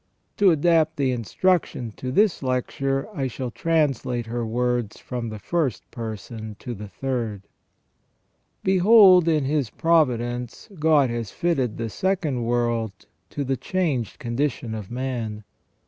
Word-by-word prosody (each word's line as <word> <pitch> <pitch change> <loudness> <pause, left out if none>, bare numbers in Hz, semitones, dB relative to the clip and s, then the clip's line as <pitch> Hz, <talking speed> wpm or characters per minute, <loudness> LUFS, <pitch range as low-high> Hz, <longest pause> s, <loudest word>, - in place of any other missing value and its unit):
To 200 -2 +6
adapt 160 -1 +3
the 135 -3 +1
instruction 125 - 0
to 130 - -4
this 205 +6 +3
lecture, 135 +1 -1
I 140 -7 -1
shall 125 0 -5
translate 135 -6 0
her 120 +1 -3
words 120 -1 -1
from 120 -2 -5
the 110 - -6
first 150 +1 -2
person 110 -1 -6
to 125 - -6
the 105 -1 -8
third: 115 -4 -3 0.4
— - - -46
" - - -46 0.3
Behold, 190 -2 +7
in 155 -4 +2
His 140 -4 0
providence 125 - 0
God 150 -5 +4
has 115 -3 -3
fitted 135 -9 -1
the 115 -1 -3
second 155 - -1
world 115 -4 -1 0.2
to 145 - -3
the 135 0 0
changed 150 - -1
condition 120 -1 -2
of 105 -4 -6
man 120 -4 -4
125 Hz, 140 wpm, -24 LUFS, 115-155 Hz, 0.4 s, Behold